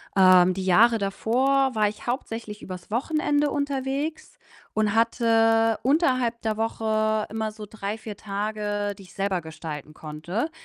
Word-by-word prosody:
Ähm, 185 -1 +6
die 190 - -4
Jahre 225 +6 +5
davor 260 +7 +1
war 215 -2 +2
ich 210 - -11
hauptsächlich 225 -4 -4
übers 180 0 -9
Wochenende 295 +3 +1
unterwegs 285 +2 -3 0.4
und 215 -1 +1
hatte 225 -1 +3
unterhalb 255 -4 +1
der 220 -1 -1
Woche 220 -1 0
immer 220 0 -2
so 215 0 -9
3, 210 0 -5
4 215 -1 -8
Tage, 205 0 -3
die - - -13
ich 180 - -16
selber 195 -2 -1
gestalten 155 -2 -8
konnte. 170 - -4
220 Hz, 140 wpm, -25 LUFS, 200-240 Hz, 0.4 s, Ähm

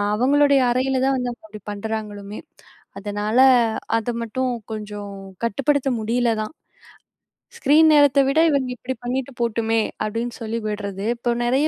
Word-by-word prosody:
அவங்களுடைய 280 +4 +4
அறையில 260 +1 +1
தான் 270 - +2
வந்து 250 -1 -2
அவங்க 235 - -12
அப்படி 215 -1 -11
பண்ணுறாங்களுமே. 205 -1 -5 0.6
அதனால 205 +3 -2 0.6
அதை 230 +2 -2
மட்டும் 255 +3 -2 0.2
கொஞ்சம் 205 -2 -6 0.3
கட்டுப்படுத்த 275 +4 +1
முடியல 235 +2 +1
தான். 215 - -5 1.1
"ஸ்க்ரீன் 315 +3 +5
நேரத்தை 285 -2 +5
விட 275 +3 +1
இவங்க 270 -3 0
இப்படி 250 +3 -5
பண்ணிட்டு 260 +2 -2
போட்டுமே." 225 -1 +1 0.2
அப்படின்னு 230 +3 -3
சொல்லி 225 +1 -3
விடுறது. 200 -1 -4
இப்போ 240 0 -1
நிறைய 265 +5 +2
235 Hz, 135 wpm, -22 LUFS, 215-265 Hz, 1.1 s, ஸ்க்ரீன்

